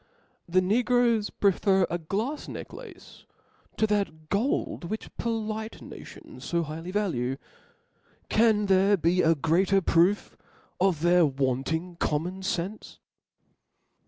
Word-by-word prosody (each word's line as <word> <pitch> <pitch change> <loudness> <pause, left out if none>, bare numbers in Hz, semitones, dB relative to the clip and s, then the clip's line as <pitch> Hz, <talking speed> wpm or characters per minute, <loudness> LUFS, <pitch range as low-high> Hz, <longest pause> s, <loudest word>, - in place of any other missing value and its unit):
The 185 +2 +3
Negroes 235 +2 +2
prefer 195 -1 +2
a 175 - -3
glafs 215 - -3
necklace - - -10 0.5
to 220 - +3
that 195 -7 -2
gold 205 -4 -1
which 215 +5 -6
polite 220 -1 -3
nations - - -11
fo 170 -1 +1
highly 160 +3 -7
value: 150 -11 -1 0.9
can 215 -2 +3
there 195 +1 +4
be 175 +2 +2
a 165 0 +4
greater 180 +6 +2
proof 180 +2 +2 0.4
of 180 -4 +2
their 175 +1 +5
wanting 140 +6 -2
common 170 +5 -2
fenfe 190 +2 -4
185 Hz, 110 wpm, -27 LUFS, 165-210 Hz, 0.9 s, their